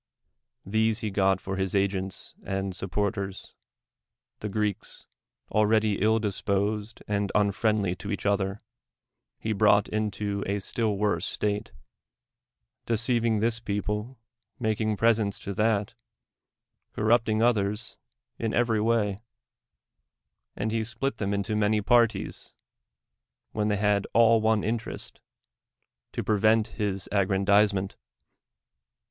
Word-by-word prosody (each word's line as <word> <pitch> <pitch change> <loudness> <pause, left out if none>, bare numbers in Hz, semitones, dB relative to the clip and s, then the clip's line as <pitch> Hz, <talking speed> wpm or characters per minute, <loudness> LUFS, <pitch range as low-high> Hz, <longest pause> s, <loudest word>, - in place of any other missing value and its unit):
Tlu 110 +2 +2
se 110 - -5
he 105 - -2
got 95 -1 +2
for 95 0 -5
his 95 0 -1
agents 95 -1 -1
and 95 -1 -3
supporters: 100 +1 -3 0.9
tlie 105 - -4
Greel:s, 105 -1 -3 0.5
already 110 -1 +2
ill 110 +2 +4
disposed 105 +1 -2
nnd 100 -1 0
unfriendly 100 -2 +1
to 100 - -6
each 100 - -4
other, 100 0 0 0.7
he 110 - -2
brought 105 0 +4
into 105 -1 -2
a 100 +1 0
still 105 +1 -1
wovae 100 -5 +1
state, 105 +2 -2 1.2
deceiving 115 0 +1
this 115 0 +1
DEMOSTHENES - - -28
people, 105 +4 -3 0.4
making 110 -2 0
presents 110 -3 +2
to 100 - -6
that, 105 +1 +1 1.0
corrupting 110 0 +2
others 105 -1 0 0.4
in 115 -1 -1
every 115 -2 +2
^^•ay; 105 -3 +1 1.3
and 110 +2 -2
he 115 0 0
split 120 +5 -2
them 100 -1 -2
into 100 +1 -1
many 105 0 +2
parties, 115 +2 +1 1.0
vdien 105 -1 0
they 105 - +1
had 105 0 +1
all 115 -1 +6
one 110 -1 +2
interest, 115 +1 -4 0.9
to - - -3
pre 105 -2 +1
vent 110 +1 +4
his 100 -4 -3
aggrandizement. 100 0 +2
105 Hz, 120 wpm, -27 LUFS, 100-110 Hz, 1.3 s, all